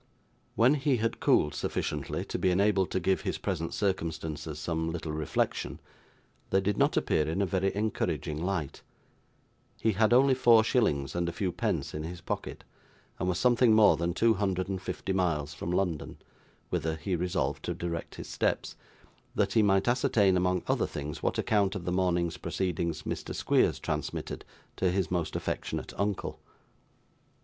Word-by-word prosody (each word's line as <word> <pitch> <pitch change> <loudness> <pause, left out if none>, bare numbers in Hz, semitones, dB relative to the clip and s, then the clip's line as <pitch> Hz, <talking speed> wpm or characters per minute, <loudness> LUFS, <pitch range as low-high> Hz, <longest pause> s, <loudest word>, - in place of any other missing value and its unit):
When 120 +5 +5
he 140 -2 +1
had 115 +1 -1
cooled 75 - +3
sufficiently - - -3
to - - -4
be 95 - +2
enabled 95 0 +2
to - - 0
give 95 +1 +1
his - - -2
present 80 +1 -3
circumstances 80 -6 -2
some 80 +1 -2
little 80 -2 -4
reflection, 75 0 -2 0.7
they 95 - +3
did 100 +1 0
not - - +2
appear 75 - +1
in 80 +5 -1
a 100 - +3
very 95 +1 0
encouraging 100 -7 -1
light; 90 -7 -2 1.0
he 110 - +2
had 110 +2 +2
only 130 +2 +6
four 120 -3 +6
shillings 70 - +1
and 85 0 -1
a - - -3
few 90 +1 -2
pence 75 -3 -2
in 75 - -4
his 85 +2 -6
pocket, - - -5 0.6
and 90 - 0
was 90 - 0
something 120 -1 +4
more 110 -2 +7
than 85 +1 -2
two 115 +2 +4
hundred 95 -3 -1
and 95 -1 -3
fifty 95 0 -3
miles 75 -6 0
from - - -5
London, 90 -4 -1 0.5
whither 80 0 -1
he 80 +4 -2
resolved 90 +1 -1
to - - -2
direct 85 -2 -4
his - - -8
steps, - - -1 0.6
that 100 -2 +1
he 110 - +5
might 95 0 +3
ascertain, 110 -6 +3
among 90 0 +1
other - - +1
things, 75 +1 -6
what - - 0
account 100 -2 +1
of 90 -4 -5
the 90 - -1
morning's 90 -2 +1
proceedings 85 -3 -2
Mr. - - -4
Squeers - - +2
transmitted - - -4 0.3
to 95 - +2
his 90 -2 0
most 85 -3 -1
affectionate - - -3
uncle. 100 0 -2
90 Hz, 170 wpm, -29 LUFS, 80-100 Hz, 1.0 s, more